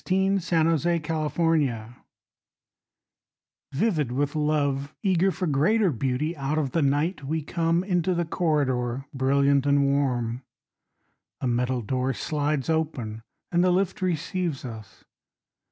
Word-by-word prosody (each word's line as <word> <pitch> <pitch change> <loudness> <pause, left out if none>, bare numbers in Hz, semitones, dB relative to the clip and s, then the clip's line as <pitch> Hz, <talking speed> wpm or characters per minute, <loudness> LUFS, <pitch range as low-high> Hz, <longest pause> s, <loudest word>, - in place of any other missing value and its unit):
FROM 190 +1 +2
THE 165 -1 +1
WOOLWORTH 155 -1 -2
TOWER 135 -9 +1 1.8
VIVID 155 - 0
with 145 +3 -1
love, 145 -2 0
eager 190 -1 +3
for 185 0 -2
greater 180 +7 +2
beauty 135 +6 -1
Out 145 +1 -2
of 140 -4 0
the 165 - +1
night 145 +4 0
we 155 +3 -2
come 165 +2 0
Into 180 -1 0
the 170 0 0
corridor, 135 -7 0
brilliant 140 +1 +2
and 140 0 +4
warm. 125 -4 0 1.0
A - - -4
metal 125 0 0
door 130 +3 -1
slides 150 -1 -1
open, 140 -9 -2 0.3
And 175 0 +3
the 185 - +4
lift 185 +1 0
receives 175 -4 -2
us. 110 -4 -10
150 Hz, 125 wpm, -26 LUFS, 135-170 Hz, 1.8 s, and